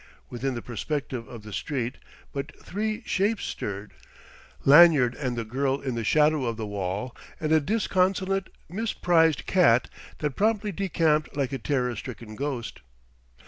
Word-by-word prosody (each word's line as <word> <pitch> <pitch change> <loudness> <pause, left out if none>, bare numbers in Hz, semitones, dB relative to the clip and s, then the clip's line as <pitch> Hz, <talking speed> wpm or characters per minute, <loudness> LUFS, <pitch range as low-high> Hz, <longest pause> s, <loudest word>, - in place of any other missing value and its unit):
Within 130 +2 -2
the 120 - -5
perspective 125 -1 -4
of 115 -3 -10
the 105 -1 -9
street 125 -3 -3 0.3
but 140 +2 -5
three 215 +3 -3
shapes 205 +3 0
stirred; 100 +1 -5 0.7
Lanyard 145 -4 +7
and 125 -4 -3
the 115 - -2
girl 135 +4 0
in 135 -3 -3
the 115 -1 -2
shadow 150 +3 +3
of 115 -2 -2
the 110 - -3
wall, 100 +4 -3 0.2
and 155 -1 -1
a 160 - +6
disconsolate, 195 +1 +1 0.2
misprized 175 -5 +2
cat 125 -11 +4 0.3
that 150 -3 -2
promptly 215 0 +1
decamped 160 -5 +1
like 140 -1 -1
a 135 - -2
terror 125 -2 0
stricken 115 -1 -8
ghost. 130 - -4
140 Hz, 145 wpm, -26 LUFS, 120-175 Hz, 0.7 s, Lanyard